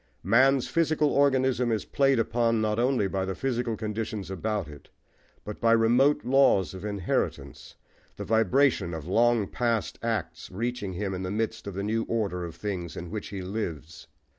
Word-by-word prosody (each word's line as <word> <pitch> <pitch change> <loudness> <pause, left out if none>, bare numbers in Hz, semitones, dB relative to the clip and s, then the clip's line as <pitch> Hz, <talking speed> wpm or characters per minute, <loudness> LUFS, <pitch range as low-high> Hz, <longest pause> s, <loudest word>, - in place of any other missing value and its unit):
Man's 130 +6 +4
physical 155 -3 +1
organism 130 -3 +2
is 110 -3 -1
played 135 -1 +2
upon 115 0 +1
not 110 0 0
only 125 -4 +2
by 95 0 -2
the 95 0 -3
physical 120 -4 -2
conditions 105 -2 -4
about 100 -1 -2
it, 75 -1 -13 0.6
but 105 - -7
by 115 0 +4
remote 125 +6 +3
laws 125 -9 +3
of 95 0 -9
inheritance, 100 -3 -3 0.4
the - - -6
vibration 115 -5 +2
of 80 -2 -7
long 115 +2 +3
past 115 -1 -1
acts 100 -9 -3
reaching 110 -1 -3
him 95 +1 -3
in 95 - -4
the 90 - -3
midst 110 +1 -3
of 100 - -6
the 100 - -3
new 110 +2 0
order 100 -6 -2
of 85 -2 -7
things 90 -5 -5
in 85 -1 -7
which 105 - -5
he 95 -2 -6
lives. 85 -6 -5
110 Hz, 170 wpm, -27 LUFS, 95-120 Hz, 0.6 s, Man's